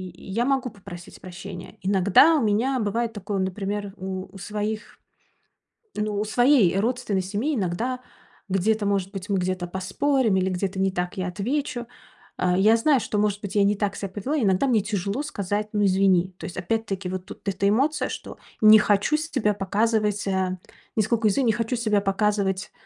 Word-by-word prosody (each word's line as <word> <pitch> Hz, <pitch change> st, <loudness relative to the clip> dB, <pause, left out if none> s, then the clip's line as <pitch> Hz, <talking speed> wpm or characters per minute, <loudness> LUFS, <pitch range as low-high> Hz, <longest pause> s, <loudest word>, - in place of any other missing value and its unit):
я 210 Hz, +7 st, -2 dB
могу 265 Hz, -2 st, +1 dB
попросить 185 Hz, -5 st, -11 dB
прощения. 185 Hz, 0 st, -9 dB
Иногда 200 Hz, -, +5 dB
у -, -, +1 dB
меня 235 Hz, +6 st, +1 dB
бывает 230 Hz, +2 st, -1 dB
такое, 205 Hz, -1 st, -3 dB
например, 195 Hz, +1 st, -3 dB
у 190 Hz, 0 st, -5 dB
у 195 Hz, -, -10 dB
своих 210 Hz, +3 st, -4 dB, 1.0 s
ну, 210 Hz, -1 st, -1 dB
у -, -, +1 dB
своей 240 Hz, -4 st, +4 dB
родственной 230 Hz, -3 st, 0 dB
семьи, 215 Hz, +11 st, -1 dB
иногда 225 Hz, +5 st, -2 dB, 0.5 s
где-то 205 Hz, +3 st, +1 dB
может 195 Hz, -1 st, 0 dB
быть, 195 Hz, -1 st, -6 dB
мы 200 Hz, -, +1 dB
где-то 185 Hz, 0 st, -2 dB
поспорим, 200 Hz, +6 st, 0 dB
или 190 Hz, 0 st, +1 dB
где-то 190 Hz, +1 st, -2 dB
не 190 Hz, 0 st, +2 dB
так 180 Hz, 0 st, -3 dB
я 185 Hz, -1 st, -2 dB
отвечу. 240 Hz, +6 st, -2 dB, 0.5 s
А, 180 Hz, 0 st, +1 dB
я 215 Hz, +4 st, +5 dB
знаю, 275 Hz, +3 st, +3 dB
что 210 Hz, -, -3 dB
может 205 Hz, -1 st, 0 dB
быть, 200 Hz, -1 st, -6 dB
я 205 Hz, -, +4 dB
не 205 Hz, -, +2 dB
так 200 Hz, -1 st, -1 dB
ся 200 Hz, -, -3 dB
повела, 250 Hz, +11 st, -3 dB
иногда 200 Hz, +2 st, +2 dB
мне 230 Hz, -5 st, +3 dB
тяжело 205 Hz, +5 st, -2 dB
сказать: 210 Hz, -6 st, -3 dB
"Ну, 210 Hz, -1 st, +1 dB
извини". 190 Hz, -1 st, +3 dB
То -, -, -7 dB
есть 175 Hz, -, -7 dB
опять-таки 195 Hz, -1 st, -2 dB
вот 185 Hz, 0 st, -5 dB
тут -, -, -12 dB
эта 195 Hz, +1 st, 0 dB
эмоция, 280 Hz, +8 st, +1 dB
что -, -, -7 dB, 0.2 s
не 215 Hz, 0 st, +9 dB
хочу 210 Hz, +8 st, +2 dB
с 315 Hz, +1 st, -4 dB
себя 210 Hz, -6 st, +1 dB
показывать, 210 Hz, +1 st, 0 dB
э, 190 Hz, -1 st, 0 dB, 0.4 s
нисколько 220 Hz, 0 st, +2 dB
не 240 Hz, -4 st, +3 dB
хочу 230 Hz, +3 st, -1 dB
себя 215 Hz, -3 st, +2 dB
показывать, 195 Hz, -1 st, 0 dB
205 Hz, 175 wpm, -24 LUFS, 190-225 Hz, 1.0 s, не